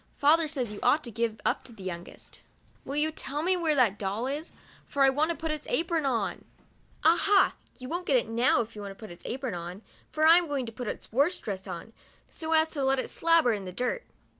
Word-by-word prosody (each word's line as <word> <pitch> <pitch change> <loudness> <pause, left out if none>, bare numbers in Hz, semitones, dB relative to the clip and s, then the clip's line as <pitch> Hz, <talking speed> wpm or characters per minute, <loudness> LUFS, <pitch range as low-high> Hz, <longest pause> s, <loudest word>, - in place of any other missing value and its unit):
Father 310 +3 +4
says 255 -7 -2
you 205 - -7
ought 305 +1 +3
to 235 - -7
give 225 0 -2
up - - +1
to - - -13
the 215 -4 -12
youngest." 175 -1 -8 0.2
" - - -34
Will 275 - -4
you 305 +1 +1
tell 295 -1 -3
me 370 +2 +3
where 330 -4 +1
that 230 -7 +3
doll 205 +4 -2
is, 290 +5 -4 0.4
for 280 - +1
I 270 - +6
want 300 +4 +1
to 340 - -1
put 320 -1 -3
its 305 -1 -4
apron 330 -3 0
on 230 -6 0
1 - - -32
" - - -33
" - - -33
Ah, 330 +2 +6
ha, 400 -1 +4 0.2
you 255 - -8
won't 350 +5 -4
get 280 - +3
it 235 - 0
now, 235 +2 +3
if 230 -1 -7
you 210 - -7
want 200 - -6
to 195 - -9
put 215 -2 -10
its 175 - -9
apron 255 -2 -3
on, 175 +4 -7 0.3
for 310 0 +1
I 330 +2 +9
am 350 - -4
going 280 -4 -2
to 230 - -6
put 240 +1 -6
its - - -6
worst 285 +10 +1
dress 195 -3 -5
on, 175 +7 -7 0.4
so 320 0 -5
as 315 0 +4
to 285 -3 -2
let 270 0 +3
it 255 - -3
slabber 330 -7 +3
in 200 -2 -6
the 185 - -6
dirt." 250 - -2
265 Hz, 265 wpm, -28 LUFS, 220-315 Hz, 0.4 s, I